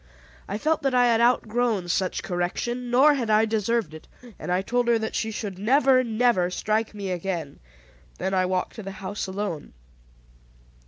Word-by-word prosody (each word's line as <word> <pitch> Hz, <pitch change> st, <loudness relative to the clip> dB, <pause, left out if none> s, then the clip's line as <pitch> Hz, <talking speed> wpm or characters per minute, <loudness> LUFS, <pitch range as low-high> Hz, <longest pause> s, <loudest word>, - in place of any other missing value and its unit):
I 200 Hz, -, -3 dB
felt 310 Hz, +7 st, 0 dB
that 270 Hz, -2 st, 0 dB
I 245 Hz, 0 st, +5 dB
had 230 Hz, -1 st, +3 dB
outgrown 235 Hz, -4 st, +1 dB
such 185 Hz, +1 st, -1 dB
correction, 240 Hz, +8 st, -3 dB
nor 270 Hz, +5 st, +5 dB
had 245 Hz, -6 st, -2 dB
I 215 Hz, +1 st, +4 dB
deserved 220 Hz, -4 st, -1 dB
it; 155 Hz, -, -11 dB, 0.3 s
and -, -, -4 dB
I 185 Hz, +1 st, +1 dB
told 245 Hz, +3 st, 0 dB
her 235 Hz, -1 st, +4 dB
that 220 Hz, 0 st, -4 dB
she 220 Hz, -, -1 dB
should 205 Hz, -4 st, -5 dB
never, 255 Hz, +4 st, +4 dB
never 225 Hz, -6 st, +2 dB
strike 215 Hz, +4 st, -1 dB
me 200 Hz, -2 st, -4 dB
again. 175 Hz, -5 st, -4 dB, 0.6 s
Then 190 Hz, -, -2 dB
I 185 Hz, -1 st, +2 dB
walked 185 Hz, 0 st, -1 dB
to -, -, -5 dB
the 195 Hz, -1 st, -7 dB
house 200 Hz, 0 st, -5 dB
alone. 190 Hz, -5 st, -5 dB
215 Hz, 175 wpm, -25 LUFS, 190-240 Hz, 0.6 s, I